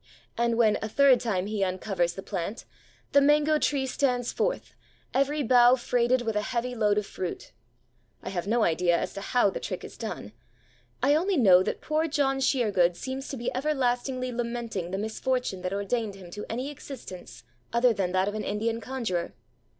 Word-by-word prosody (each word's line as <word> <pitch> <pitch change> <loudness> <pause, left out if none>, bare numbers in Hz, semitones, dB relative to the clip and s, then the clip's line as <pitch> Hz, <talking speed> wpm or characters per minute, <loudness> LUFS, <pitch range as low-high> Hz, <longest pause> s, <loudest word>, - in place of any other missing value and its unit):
And 235 0 +1
when 220 -3 +3
a 220 - -3
third 270 +1 +5
time 195 -6 -1
he 210 -1 -1
uncovers 185 -2 -1
the 195 - -8
plant, 195 +3 -4 0.5
the 280 - +6
mango 300 +2 +4
tree 280 -3 +1
stands 250 -2 0
forth, - - -2 0.4
every 280 +3 +1
bough 245 0 +6
freighted 245 0 +1
with 225 -2 -2
a 210 - +2
heavy 245 +3 -2
load 210 -3 +2
of 210 - 0
fruit! 185 -2 -6 0.7
I - - -4
have 185 -1 -3
no 230 +1 +2
idea 175 0 +2
as - - -3
to 200 - -6
how 225 -1 +2
the - - -4
trick 185 - -5
is - - -10
done. 210 - -5 0.7
I 280 +2 +5
only 360 +4 +2
know 190 -8 +7
that - - -2
poor 310 +1 0
John 280 -3 +1
Sheergood 205 -10 +2
seems 265 +6 -5
to 275 - -5
be 235 - -3
everlastingly 255 -2 -1
lamenting 235 -6 -3
the 190 - -3
misfortune 220 -1 -2
that 180 0 -3
ordained 200 +1 -2
him 185 -3 -12
to 210 - -7
any 255 +5 -3
existence 185 - -10 0.3
other 235 0 +4
than 190 -3 -1
that 185 +1 +1
of 205 - -2
an 215 - -3
Indian 225 +3 -2
conjurer. 225 -11 -3
235 Hz, 185 wpm, -27 LUFS, 195-260 Hz, 0.7 s, know